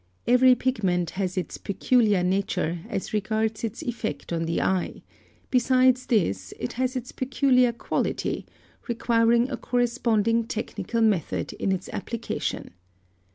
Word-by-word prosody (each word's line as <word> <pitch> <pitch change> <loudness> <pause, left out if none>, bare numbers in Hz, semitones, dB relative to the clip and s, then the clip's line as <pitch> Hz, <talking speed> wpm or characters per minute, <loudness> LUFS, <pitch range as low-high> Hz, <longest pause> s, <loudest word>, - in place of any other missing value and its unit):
Every 250 +1 +6
pigment 195 -9 0
has 185 -1 -3
its 185 - -3
peculiar 210 -1 +2
nature 180 -2 0
as 195 - -4
regards 220 +1 -1
its 230 0 -4
effect 235 -6 -4
on 165 0 -1
the 165 +1 -1
eye; 190 -2 -1 0.5
besides 255 0 +3
this 100 - 0
it 125 - -4
has 255 +1 -1
its 250 -1 -4
peculiar 255 -1 +2
quality, 235 - -2 0.4
requiring 235 +1 +2
a - - -2
corresponding 230 -2 +1
technical 225 0 -3
method 205 -8 +1
in 195 - -1
its 190 -1 -2
application. 230 +3 -4
225 Hz, 125 wpm, -25 LUFS, 190-245 Hz, 0.5 s, Every